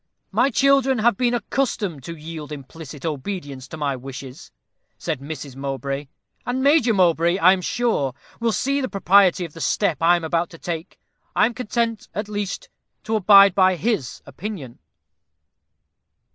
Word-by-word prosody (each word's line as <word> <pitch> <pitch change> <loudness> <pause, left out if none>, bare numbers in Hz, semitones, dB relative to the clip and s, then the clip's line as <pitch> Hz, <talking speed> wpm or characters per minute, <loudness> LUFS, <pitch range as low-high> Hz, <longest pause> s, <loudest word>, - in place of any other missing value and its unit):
"My - - +3
children 270 0 +3
have 230 0 +3
been 245 +2 +1
accustomed 205 - -2
to 170 0 -7
yield 155 -1 -8
implicit 145 +1 -9
obedience 145 -4 -5
to 160 - -8
my 145 -3 -1
wishes," 135 +3 -9 0.5
said 160 -5 -3
Mrs. 140 -2 -7
Mowbray, 135 +1 -4 0.4
"and 250 +2 -2
Major 280 -4 +4
Mowbray, 170 -3 +3
I 185 0 +6
am 190 - -2
sure, 180 - 0 0.2
will 230 -1 +1
see 275 +5 0
the 260 - -2
propriety 195 -2 +4
of 160 - -11
the 165 - -9
step 185 -3 0
I 170 +2 +5
am 175 - -3
about 165 +1 0
to 165 - -12
take. 165 -1 -6 0.4
I - - +5
am 240 - -1
content, 230 -1 -2
at 205 +1 -3
least, 205 -2 -4 0.4
to 220 - -1
abide 200 -1 +7
by 185 0 +4
his 205 - -2
opinion." 165 - -7
180 Hz, 160 wpm, -22 LUFS, 150-220 Hz, 0.5 s, abide